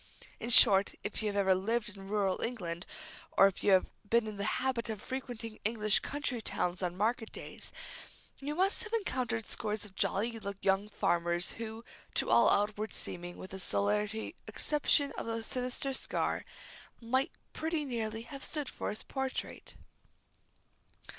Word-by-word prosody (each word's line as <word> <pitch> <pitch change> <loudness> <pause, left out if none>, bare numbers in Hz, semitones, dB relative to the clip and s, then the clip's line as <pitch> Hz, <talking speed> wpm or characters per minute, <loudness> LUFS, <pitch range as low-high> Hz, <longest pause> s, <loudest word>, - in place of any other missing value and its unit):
In 235 - -4
short, 200 -5 +9
if 205 - -2
you 215 - 0
have 205 - -2
ever 195 -2 +4
lived 225 +5 0
in 195 -1 -10
rural 200 -2 0
England, 180 -7 -3 0.5
or - - +9
if 195 -2 +1
you 205 - +4
have 185 - +4 0.2
been 235 -1 +4
in 215 -1 -6
the 200 - -2
habit 255 -3 -1
of 215 -2 -3
frequenting 240 -2 -5
English 215 -1 +3
country 275 -4 -2
towns 180 -3 -1
on 180 -1 -2
market 225 +2 0
days, - - -7 0.7
you 290 +2 -3
must 380 +3 +2
have 440 0 -8
encountered 255 - -1
scores 215 -1 -1
of 200 - -8
jolly 225 +3 0 0.2
young 195 +2 +2
farmers 175 -2 +1
who, 225 0 -7 0.3
to - - +2
all - - +6
outward 210 +1 +1
seeming, 175 0 -6
with 185 - -9
the 190 - -5
solitary 210 +3 0
exception 290 -1 +2
of - - -5
the 225 0 -2
sinister 255 +3 -1
scar, - - -1 0.5
might 260 +3 +1 0.2
pretty 320 -1 -1
nearly 225 -3 -3
have 275 +2 -8
stood 295 -4 -1
for - - -4
his 210 - -5
portrait. 265 -1 -4
220 Hz, 160 wpm, -32 LUFS, 200-250 Hz, 0.7 s, short